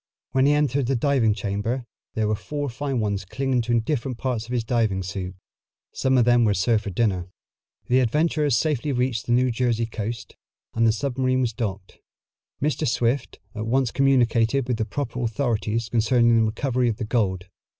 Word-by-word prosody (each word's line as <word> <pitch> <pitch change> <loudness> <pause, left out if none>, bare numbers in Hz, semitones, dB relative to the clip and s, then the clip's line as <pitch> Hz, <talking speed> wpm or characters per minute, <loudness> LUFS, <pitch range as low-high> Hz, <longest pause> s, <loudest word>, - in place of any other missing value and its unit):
When 135 +1 +3
he 145 - +4
entered 140 -3 +1
the 135 - +1
diving 120 -4 +2
chamber 105 +5 -2 0.3
there 110 -1 +1
were 105 - +1
four 145 +8 -4
fine 135 +1 -3
ones 100 -2 -1
clinging 130 +6 -1
to 120 0 +1
different 125 0 -2
parts 120 -3 -2
of - - -9
his 120 -2 0
diving 110 -5 0
suit. 95 0 -5 0.6
Some 130 0 +1
of 120 - +4
them 120 0 +4
were 105 -3 +2
served 110 +2 +1
for - - -2
dinner. 95 -3 0 0.6
The 125 +1 +3
adventurers 150 +2 +2
safely 150 -1 0
reached 125 -2 -1
the - - -1
New 125 +1 +3
Jersey 115 -1 0
coast, 115 0 -6 0.4
and 115 0 +3
the - - +5
submarine 130 +2 0
was 120 -3 0
docked. 100 -5 -5 0.6
Mr. 150 0 0
Swift 120 +2 0 0.2
at 110 0 -4
once 130 0 +1
communicated 130 -1 +2
with 125 -3 0
the 110 - -1
proper 120 +2 -4
authorities 115 -2 -1
concerning 115 +1 +3
the 115 -1 +4
recovery 125 +2 0
of 110 - -2
the 115 - -3
gold. 95 -6 0
120 Hz, 180 wpm, -24 LUFS, 110-130 Hz, 0.6 s, the